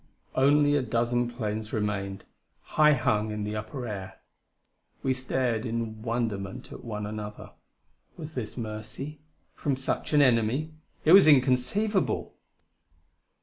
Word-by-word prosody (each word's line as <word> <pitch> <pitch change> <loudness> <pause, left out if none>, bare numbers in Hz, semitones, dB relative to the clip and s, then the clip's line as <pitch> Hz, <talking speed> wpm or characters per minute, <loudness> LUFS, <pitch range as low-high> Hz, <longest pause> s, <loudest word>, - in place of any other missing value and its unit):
Only 145 +2 +4
a 145 - +3
dozen 120 0 0
planes 110 -2 -4
remained, 100 -2 -2 0.5
high 150 0 +6
hung 110 -4 +1
in 105 0 -3
the 105 +1 -3
upper 120 +4 -5
air. 95 -4 -6 0.8
We 130 - +2
stared 125 -3 -1
in 115 -2 -3
wonderment 110 -4 -3
at - - -9
one 105 -3 -4
another. 105 0 -7 0.7
Was 155 -1 -7
this 115 -5 -5
mercy? 110 +6 -6 0.3
from 140 -2 -1
such 135 +1 -3
an 145 - +6
enemy? 125 +5 +2 0.3
It 155 - +5
was 195 -3 +9
inconceivable! 150 - +2
120 Hz, 125 wpm, -28 LUFS, 110-135 Hz, 0.8 s, was